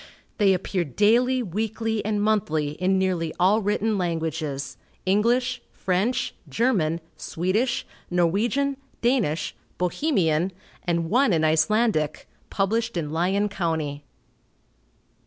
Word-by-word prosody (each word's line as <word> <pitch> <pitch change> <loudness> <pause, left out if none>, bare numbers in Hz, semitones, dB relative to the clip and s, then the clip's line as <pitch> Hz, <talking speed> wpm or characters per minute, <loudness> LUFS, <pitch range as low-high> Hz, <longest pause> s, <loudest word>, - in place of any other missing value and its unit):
They 195 -2 +5
appear 185 0 -1
daily, 235 - +3
weekly 220 +2 -2
and 210 0 0
monthly, 160 -9 +1
in 185 +5 +1
nearly 180 -4 0
all 195 +5 +4
written 210 +1 0
languages, 160 -5 -2 0.3
English, 240 +6 +2
French, 210 +7 0 0.2
German, 180 -10 +1 0.2
Swedish, 210 +9 -1 0.2
Norwegian, 215 +11 +1 0.3
Danish, 225 - +1 0.2
Bohemian, 180 - +1 0.3
and 170 -2 0
one 255 -2 +4
in 160 -1 +2
Icelandic, 160 0 +2 0.2
published 225 +2 0
in 150 -3 -2
Lyon 190 +5 +1
county. 160 -7 -2
190 Hz, 100 wpm, -25 LUFS, 165-225 Hz, 0.3 s, They